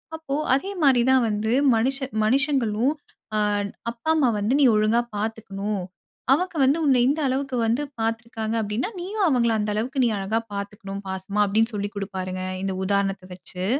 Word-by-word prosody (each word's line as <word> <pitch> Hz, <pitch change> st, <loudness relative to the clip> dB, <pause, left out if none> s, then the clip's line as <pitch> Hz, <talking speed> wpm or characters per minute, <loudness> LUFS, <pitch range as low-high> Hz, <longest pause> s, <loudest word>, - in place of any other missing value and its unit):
அப்போ, 320 Hz, -4 st, -4 dB, 0.2 s
அதே 275 Hz, +9 st, 0 dB
மாரி 265 Hz, -4 st, +5 dB
தான் 260 Hz, -1 st, +5 dB
வந்து, 215 Hz, +1 st, -1 dB, 0.2 s
மனுஷ 255 Hz, +5 st, +1 dB, 0.3 s
மனுஷங்களும் 260 Hz, 0 st, +2 dB, 0.4 s
அ -, -, +2 dB, 0.5 s
அப்பா, 235 Hz, +6 st, -6 dB
அம்மா 285 Hz, -6 st, +3 dB
வந்து 210 Hz, +5 st, +1 dB
நீ -, -, +5 dB
ஒழுங்கா 215 Hz, +3 st, +3 dB, 0.2 s
பாத்துக்கணும். 205 Hz, -2 st, -3 dB, 0.5 s
அவங்க 360 Hz, +4 st, -1 dB
வந்து, 270 Hz, +4 st, +4 dB
உன்னை 260 Hz, -4 st, +4 dB
இந்த 295 Hz, +3 st, 0 dB
அளவுக்கு 265 Hz, 0 st, -1 dB
வந்து 235 Hz, +6 st, +1 dB, 0.2 s
பாத்துருக்காங்க 225 Hz, 0 st, -2 dB
அப்படின்னா, 215 Hz, -, -2 dB
நீயும் 390 Hz, +2 st, 0 dB
அவங்கள 235 Hz, -4 st, +2 dB
அந்த 210 Hz, 0 st, -1 dB
அளவுக்கு, 255 Hz, +5 st, 0 dB
நீ -, -, +3 dB
அழகா 205 Hz, +4 st, 0 dB
பாத்துக்கணும், 200 Hz, 0 st, -6 dB
பாசமா." 190 Hz, +2 st, -2 dB
அப்படின்னு 220 Hz, +3 st, +1 dB
சொல்லி 205 Hz, 0 st, -2 dB
குடுப்பாருங்க, 185 Hz, -2 st, -4 dB, 0.2 s
இந்த 195 Hz, -1 st, -2 dB
உதாரணத்தை 195 Hz, -1 st, 0 dB
வெச்சு. 180 Hz, 0 st, -7 dB
225 Hz, 155 wpm, -24 LUFS, 200-265 Hz, 0.5 s, மாரி